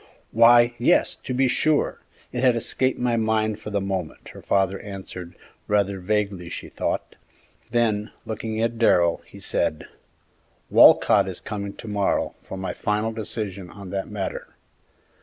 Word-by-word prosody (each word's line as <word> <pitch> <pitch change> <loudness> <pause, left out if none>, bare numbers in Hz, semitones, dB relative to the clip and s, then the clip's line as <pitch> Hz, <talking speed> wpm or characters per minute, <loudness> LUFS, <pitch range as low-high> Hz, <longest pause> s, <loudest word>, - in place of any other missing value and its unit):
"Why, 120 +1 +6
yes, 120 - +3
to - - -8
be 130 +1 +2
sure; 150 +4 +1 0.3
it 125 - -3
had 125 -2 +5
escaped 130 +3 0
my 120 -1 +1
mind 110 -1 0
for 105 - -7
the 100 -1 0
moment," 95 -4 -4
her - - -11
father 95 0 +1
answered, 95 -3 -8 0.3
rather 100 -2 +1
vaguely 100 -2 -1
she - - -7
thought; - - -3 0.5
then, 110 -3 0
looking 110 0 -4
at 115 0 -1
Darrell, 85 -7 +3
he - - -13
said, 75 - -1 0.9
"Walcott - - +6
is - - -5
coming 100 -2 -5
to - - -11
morrow 100 -2 0
for 95 - -8
my 95 0 -4
final 105 +2 -1
decision 105 -4 -5
in 95 -2 -8
that 95 -1 -3
matter." 100 -2 -5
105 Hz, 150 wpm, -24 LUFS, 95-115 Hz, 0.9 s, Why